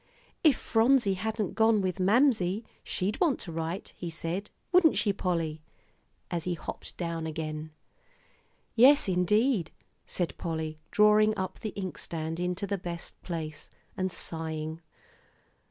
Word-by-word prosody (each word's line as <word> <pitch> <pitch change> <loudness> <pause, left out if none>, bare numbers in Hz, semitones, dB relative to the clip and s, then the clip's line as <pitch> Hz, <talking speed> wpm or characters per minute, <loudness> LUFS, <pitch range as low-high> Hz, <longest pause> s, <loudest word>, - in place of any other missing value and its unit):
"If 300 -6 +6
Phronsie 230 -2 +3
hadn't 215 +1 -2
gone 220 -1 +4
with 185 -1 -1
Mamsie, 210 -1 +3 0.2
she'd 200 +3 -2
want 320 -8 +3
to 170 - -6
write," 165 +3 -4
he 175 - -5
said, 170 +5 -4 0.2
"wouldn't 355 -4 +5
she, 205 0 +2
Polly?" 165 -5 -1 0.7
as 170 -2 -2
he 180 -1 0
hopped 160 - -7
down 165 -2 -3
again. 155 0 -4 1.0
"Yes, 275 +4 +6
indeed," 190 - +2 0.4
said 175 -2 -1
Polly, 160 -2 -3
drawing 210 0 +5
up 185 -1 -3
the 220 - -3
inkstand 165 -3 -4
into 180 +3 -1
the 200 -1 -2
best 170 -2 -6
place, 160 -3 -5 0.3
and 185 0 -1
sighing. 160 -1 -3
185 Hz, 130 wpm, -29 LUFS, 165-215 Hz, 1.0 s, If